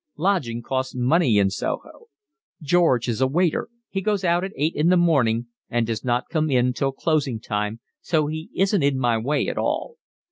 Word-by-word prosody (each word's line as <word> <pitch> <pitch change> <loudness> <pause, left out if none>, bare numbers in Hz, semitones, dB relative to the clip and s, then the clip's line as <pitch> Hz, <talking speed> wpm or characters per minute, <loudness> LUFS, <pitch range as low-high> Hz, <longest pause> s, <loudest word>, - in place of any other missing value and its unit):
Lodging 145 -11 0
costs 130 +1 -2
money 125 -1 +3
in 100 -1 +3
Soho. - - -5 0.5
George 150 -6 +2
is 120 +1 -2
a 130 - +4
waiter, 170 +4 0 0.2
he 195 - -3
goes 205 -1 0
out 175 0 +2
at 195 - -4
eight 155 +3 0
in 155 +3 +2
the 180 - +5
morning 125 -10 +2 0.2
and 120 -1 0
does 110 -1 -3
not 125 0 0
come 155 -2 +1
in 125 -2 +2
till 135 +2 -1
closing 140 -4 -1
time, 105 0 -3 0.2
so 155 -3 +1
he 155 +2 -5
isn't 195 0 +2
in 140 -1 +2
my 120 -3 +1
way 140 +7 0
at - - -2
all. 475 - -2
140 Hz, 190 wpm, -23 LUFS, 120-170 Hz, 0.5 s, the